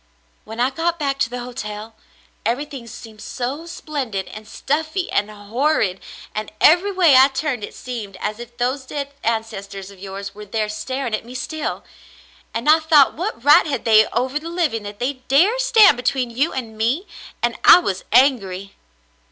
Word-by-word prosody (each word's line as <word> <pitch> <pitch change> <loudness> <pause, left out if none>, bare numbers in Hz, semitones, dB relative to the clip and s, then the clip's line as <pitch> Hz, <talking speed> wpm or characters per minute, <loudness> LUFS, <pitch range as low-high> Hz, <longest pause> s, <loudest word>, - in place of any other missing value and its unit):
"When 225 +1 -8
I 250 +2 +2
got 335 +4 -1
back 275 -3 -2
to 230 - +1
the 245 0 -5
hotel, 225 -3 -7 0.5
everything 260 +2 -3
seemed 220 -2 -11
so 275 +6 -5
splendid 275 - -4
and 215 0 -10
stuffy 315 +5 -2
and 205 +1 +1
horrid 215 -1 -1 0.2
— - - -17
and 215 0 -4
every 355 +6 +5
way 355 -7 +5
I 260 +1 +8
turned 270 -4 -3
it - - -7
seemed 220 -6 -7
as 210 +3 -3
if 240 0 -11
those 260 +2 -1
dead 280 0 -5
ancestors 200 -4 -3
of 195 - -16
yours 195 +1 -7
were 210 0 -11
there 215 +1 -1
staring 250 +3 -4
at 215 - -1
me 245 +2 -11
still; 310 +4 -4 0.7
and 230 +5 -4
I 310 +2 +7
thought 310 -4 +5
what 350 - -4
right 290 +3 +6
had 275 -5 -3
they 220 -1 +6
over 260 +4 -1
the 325 +2 -7
living 330 -10 -1
that 205 0 -8
they 255 +3 -3
dared 380 - +4
stand 445 - +6
between 250 0 -1
you 275 +8 0
and 230 -4 -5
me; 255 - 0 0.4
and - - +1
I - - +10
was 195 - -2
angry." 200 -7 +2
250 Hz, 180 wpm, -21 LUFS, 215-295 Hz, 0.7 s, I